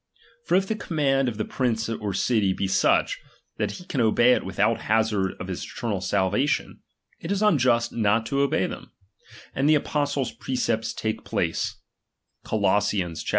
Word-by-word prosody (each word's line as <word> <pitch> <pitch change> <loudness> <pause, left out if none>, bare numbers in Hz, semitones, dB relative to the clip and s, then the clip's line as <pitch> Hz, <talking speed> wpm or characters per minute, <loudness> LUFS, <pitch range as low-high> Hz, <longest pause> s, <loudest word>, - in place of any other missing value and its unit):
For - - +2
if 190 +1 +2
the 220 - 0
command 135 -9 +1
of 110 - -7
the 110 - -2
^H - - -16
prince 120 -4 0
or 105 -3 -3
city 105 -3 +2
be 95 - -2
such, 95 - +2 0.4
that 105 -2 -1
he 180 - -10
can 135 - -1
obey 120 +2 +5
it - - 0
without - - +1
^H - - -12
hazard 105 -3 +1
of 90 - -6
his 95 -2 -4
eternal 105 -6 -4
salvation, 100 +8 0 0.4
it 165 - -5
is 200 +1 0
unjust 125 - +3
not 110 0 +2
to 140 +5 -2
^H - - +2
obey 140 0 +2
them; - - -8 0.6
and 140 +2 +1
the 155 - +6
apostle's 145 -3 -1
precepts 115 -3 -2
take 110 0 -3
place - - -1 0.7
^H - - -13
(Col. 105 -1 +2
115 Hz, 180 wpm, -25 LUFS, 105-140 Hz, 0.7 s, the